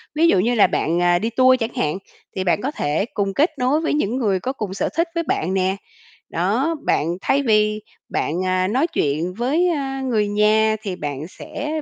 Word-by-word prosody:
Ví 325 Hz, +2 st, +4 dB
dụ 190 Hz, -, +4 dB
như 235 Hz, +5 st, +1 dB
là 215 Hz, -, +6 dB
bạn, 170 Hz, +2 st, 0 dB
ờ, 175 Hz, 0 st, +3 dB
đi 225 Hz, -, -1 dB
tour 255 Hz, +2 st, +4 dB
chẳng 225 Hz, 0 st, -3 dB
hạn 150 Hz, +4 st, 0 dB, 0.4 s
thì 190 Hz, -, -1 dB
bạn 185 Hz, +2 st, +1 dB
có 275 Hz, +4 st, -2 dB
thể 150 Hz, -, -1 dB
cùng 195 Hz, -1 st, -1 dB
kết 305 Hz, -, +2 dB
nối 265 Hz, +5 st, +2 dB
với 325 Hz, -, 0 dB
những 245 Hz, -6 st, 0 dB
người 200 Hz, -7 st, +1 dB
có 260 Hz, +6 st, -3 dB
cùng 210 Hz, -7 st, -5 dB
sở 195 Hz, -, -1 dB
thích 335 Hz, +1 st, +2 dB
với 335 Hz, -, 0 dB
bạn 185 Hz, -, -1 dB
nè. 190 Hz, 0 st, +1 dB, 0.5 s
Đó, 230 Hz, -, 0 dB
bạn 170 Hz, +4 st, +1 dB
thay 280 Hz, +1 st, +1 dB
vì 215 Hz, -2 st, +2 dB, 0.3 s
bạn, 180 Hz, +4 st, -1 dB
à, 185 Hz, 0 st, +1 dB
nói 265 Hz, -, +1 dB
chuyện 160 Hz, -, -1 dB
với, 280 Hz, -, +1 dB
a, 270 Hz, -4 st, -2 dB
người 225 Hz, -5 st, 0 dB
nhà 215 Hz, +1 st, +3 dB
thì 195 Hz, -4 st, -4 dB
bạn 145 Hz, 0 st, -5 dB
sẽ 300 Hz, +8 st, -5 dB
215 Hz, 215 wpm, -21 LUFS, 185-270 Hz, 0.5 s, là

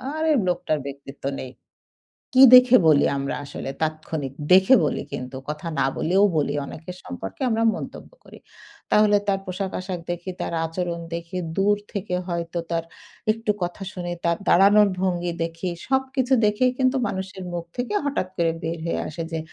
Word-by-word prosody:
"আরে 315 Hz, 0 st, +1 dB, 0.2 s
লোকটার 175 Hz, -4 st, 0 dB
ব্যক্তিত্ব 140 Hz, 0 st, -10 dB, 0.2 s
নেই।" 130 Hz, -, -7 dB, 0.8 s
কি 260 Hz, -, +8 dB
দেখে 255 Hz, 0 st, +9 dB
বলি? 145 Hz, -2 st, +5 dB
আমরা 140 Hz, 0 st, -2 dB
আসলে 140 Hz, -1 st, -6 dB
তাৎক্ষণিক 155 Hz, -3 st, -3 dB, 0.2 s
দেখে 190 Hz, +7 st, +7 dB
বলি 150 Hz, -, -1 dB
কিন্তু 130 Hz, -1 st, -5 dB
কথা 150 Hz, +3 st, -5 dB
না -, -, +3 dB
বলেও 185 Hz, +5 st, +2 dB
বলি। 145 Hz, -1 st, +1 dB
অনেকের 175 Hz, +5 st, -9 dB
সম্পর্কে 90 Hz, +2 st, -7 dB
আমরা 225 Hz, 0 st, +1 dB
মন্তব্য -, -, -8 dB
করি। -, -, -14 dB, 0.5 s
তাহলে 210 Hz, -1 st, +5 dB
তার 195 Hz, -1 st, +2 dB
পোশাক-আশাক 185 Hz, -1 st, -4 dB
দেখি, 175 Hz, +2 st, -4 dB
তার -, -, -3 dB
আচরণ 170 Hz, +1 st, -3 dB
দেখি, 170 Hz, +2 st, -6 dB, 0.2 s
দূর 205 Hz, +1 st, +3 dB, 0.2 s
থেকে 195 Hz, -2 st, -3 dB
হয়তো 170 Hz, 0 st, -3 dB
তার 165 Hz, -1 st, -1 dB, 0.5 s
একটু 225 Hz, -1 st, -3 dB
কথা 175 Hz, +3 st, -3 dB
শুনি, 175 Hz, -1 st, -5 dB
তার 170 Hz, 0 st, +2 dB
দাঁড়ানোর 205 Hz, +3 st, +6 dB
ভঙ্গি 175 Hz, -2 st, 0 dB
দেখি, 165 Hz, +2 st, -4 dB, 0.2 s
সবকিছু 265 Hz, 0 st, +1 dB
দেখেই 210 Hz, +5 st, +2 dB
কিন্তু 260 Hz, 0 st, +2 dB
মানুষের 190 Hz, -1 st, -5 dB
মুখ 170 Hz, -1 st, -4 dB
থেকে 245 Hz, -4 st, -2 dB
হঠাৎ 275 Hz, -10 st, -1 dB
করে 165 Hz, -2 st, +2 dB
বের 165 Hz, +1 st, -2 dB
হয়ে -, -, -1 dB
আসে 165 Hz, +2 st, -5 dB
যে, 165 Hz, -, -1 dB
180 Hz, 160 wpm, -23 LUFS, 165-205 Hz, 0.8 s, দেখে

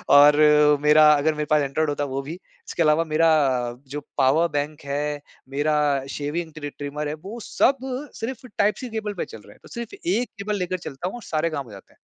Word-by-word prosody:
और 145 Hz, +1 st, +8 dB, 0.5 s
मेरा 150 Hz, +1 st, +6 dB
अगर 150 Hz, +2 st, +2 dB
मेरे 150 Hz, 0 st, -3 dB
पास 150 Hz, -1 st, +4 dB
एंड्रॉइड 145 Hz, +3 st, 0 dB
होता 145 Hz, 0 st, -1 dB
वो 135 Hz, 0 st, -3 dB
भी। 145 Hz, +4 st, -7 dB
इसके 175 Hz, -1 st, -5 dB
अलावा 155 Hz, +1 st, +3 dB
मेरा 165 Hz, +1 st, +2 dB, 0.4 s
अ, -, -, -11 dB
जो 145 Hz, +3 st, -5 dB, 0.2 s
पावर 145 Hz, +5 st, +4 dB
बैंक 145 Hz, +1 st, -3 dB
है, 145 Hz, +1 st, -2 dB, 0.3 s
मेरा 145 Hz, -1 st, +1 dB
शेविंग 160 Hz, +4 st, -3 dB
ट्रि 145 Hz, -1 st, -5 dB
ट्रिमर 145 Hz, +1 st, -4 dB
है 145 Hz, -, -3 dB
वो 220 Hz, +5 st, -7 dB
सब 275 Hz, -, +2 dB, 0.4 s
सिर्फ़ 250 Hz, +2 st, -5 dB
टाइप-सी 210 Hz, +5 st, +1 dB
केबल 215 Hz, -2 st, -4 dB
पे 180 Hz, -, -4 dB
चल 110 Hz, -, -11 dB
रहे -, -, -15 dB
हैं। -, -, -24 dB
तो -, -, -14 dB
सिर्फ 235 Hz, +6 st, -6 dB
1 250 Hz, -8 st, 0 dB
केबल 205 Hz, +1 st, -2 dB
लेकर 185 Hz, 0 st, -2 dB
चलता 140 Hz, +6 st, -5 dB
हूँ 190 Hz, -, -5 dB
और 240 Hz, -, -9 dB
सारे 160 Hz, +1 st, -1 dB
काम 145 Hz, -4 st, -4 dB
हो 115 Hz, -, -14 dB
जाते 100 Hz, -1 st, -14 dB
हैं। -, -, -32 dB
150 Hz, 220 wpm, -23 LUFS, 145-180 Hz, 0.5 s, और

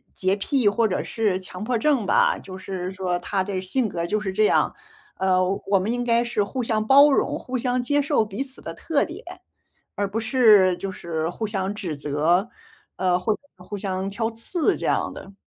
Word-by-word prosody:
洁 190 Hz, +1 st, +1 dB
癖 240 Hz, +1 st, +2 dB
或 225 Hz, +2 st, +2 dB
者 185 Hz, -, -2 dB
是 210 Hz, -5 st, 0 dB
强 185 Hz, +1 st, -7 dB
迫 240 Hz, +2 st, 0 dB
症 265 Hz, -2 st, +1 dB
吧， -, -, +3 dB
就 185 Hz, -1 st, -9 dB
是 185 Hz, -1 st, -5 dB
说 185 Hz, -2 st, -2 dB
他 190 Hz, +2 st, -1 dB
的 190 Hz, -1 st, -3 dB
性 215 Hz, +5 st, -1 dB
格 170 Hz, -2 st, -3 dB
就 215 Hz, +5 st, 0 dB
是 195 Hz, -2 st, -3 dB
这 215 Hz, +3 st, +2 dB
样。 -, -, +2 dB, 0.4 s
呃， 185 Hz, -1 st, +2 dB, 0.2 s
我 195 Hz, -1 st, +3 dB
们 200 Hz, +5 st, -1 dB
应 245 Hz, 0 st, -1 dB
该 235 Hz, 0 st, +3 dB
是 235 Hz, -3 st, -1 dB
互 250 Hz, +5 st, -3 dB
相 220 Hz, -2 st, 0 dB
包 280 Hz, +4 st, +7 dB
容， 270 Hz, -, +1 dB
互 255 Hz, 0 st, -4 dB
相 250 Hz, +1 st, 0 dB
接 290 Hz, +3 st, +2 dB
受 280 Hz, -4 st, +2 dB
彼 210 Hz, +3 st, -5 dB
此 270 Hz, -1 st, -6 dB
的 -, -, -6 dB
特 310 Hz, -4 st, 0 dB
点， 335 Hz, +5 st, -7 dB, 0.7 s
而 205 Hz, -, -1 dB
不 205 Hz, -, -4 dB
是， 220 Hz, -6 st, +5 dB
就 195 Hz, +2 st, -4 dB
是 160 Hz, -3 st, -3 dB
互 220 Hz, +5 st, -4 dB
相 195 Hz, -2 st, -2 dB
指 185 Hz, -7 st, -4 dB
责， 155 Hz, +8 st, +1 dB, 0.5 s
呃， 180 Hz, -1 st, +1 dB
或 215 Hz, +4 st, +1 dB
者 -, -, -9 dB, 0.2 s
互 180 Hz, +3 st, -7 dB
相 190 Hz, -1 st, -3 dB
挑 225 Hz, +3 st, -2 dB
刺 320 Hz, -, 0 dB
这 -, -, -5 dB
样 -, -, 0 dB
的。 195 Hz, -, -11 dB
205 Hz, 225 characters per minute, -24 LUFS, 185-235 Hz, 0.7 s, 包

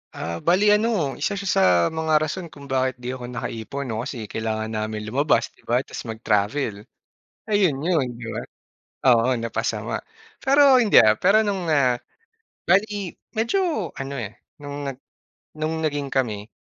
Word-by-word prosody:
Ah, 85 Hz, -, -4 dB
bale 180 Hz, +4 st, +4 dB
ano, 220 Hz, +2 st, +1 dB, 0.3 s
isa 150 Hz, -, 0 dB
siya 200 Hz, -, -6 dB
sa -, -, +4 dB, 0.4 s
mga 160 Hz, 0 st, 0 dB
rason 155 Hz, +4 st, -3 dB
kung 140 Hz, -1 st, -12 dB
bakit 130 Hz, -1 st, +1 dB
'di 125 Hz, +1 st, -5 dB
ako 130 Hz, -1 st, -7 dB
nakaipon, 125 Hz, +2 st, -5 dB
'no, 110 Hz, -3 st, -3 dB
kasi 120 Hz, -2 st, -5 dB
kailangan 110 Hz, +1 st, -3 dB
namin 110 Hz, 0 st, -3 dB
lumabas, 130 Hz, 0 st, +2 dB
'di -, -, -26 dB
ba, 125 Hz, +3 st, +2 dB
ta's -, -, -7 dB
mag-travel. 110 Hz, +2 st, 0 dB, 0.7 s
Ayun 200 Hz, -9 st, +3 dB
'yon, 165 Hz, -7 st, +2 dB
'di 120 Hz, -, -9 dB
ba? -, -, -3 dB, 0.7 s
Oo, 120 Hz, +1 st, +5 dB
napasama. 115 Hz, -1 st, -2 dB, 0.5 s
Pero 280 Hz, +2 st, +5 dB
hindi, 230 Hz, -5 st, +4 dB
ah, 110 Hz, -1 st, +5 dB
pero 195 Hz, -, +4 dB
nung, 200 Hz, -4 st, -1 dB
ah, 130 Hz, -5 st, +3 dB, 0.7 s
bale 200 Hz, +3 st, +4 dB, 0.5 s
medyo 230 Hz, -, 0 dB
ano, 135 Hz, +1 st, -6 dB
eh, 105 Hz, -, -6 dB, 0.3 s
nung 145 Hz, 0 st, -5 dB
nag 135 Hz, -, -5 dB, 0.6 s
nung 155 Hz, +1 st, -2 dB
naging 145 Hz, -2 st, -2 dB
kami, 110 Hz, -5 st, -1 dB
135 Hz, 155 wpm, -23 LUFS, 115-170 Hz, 0.7 s, Oo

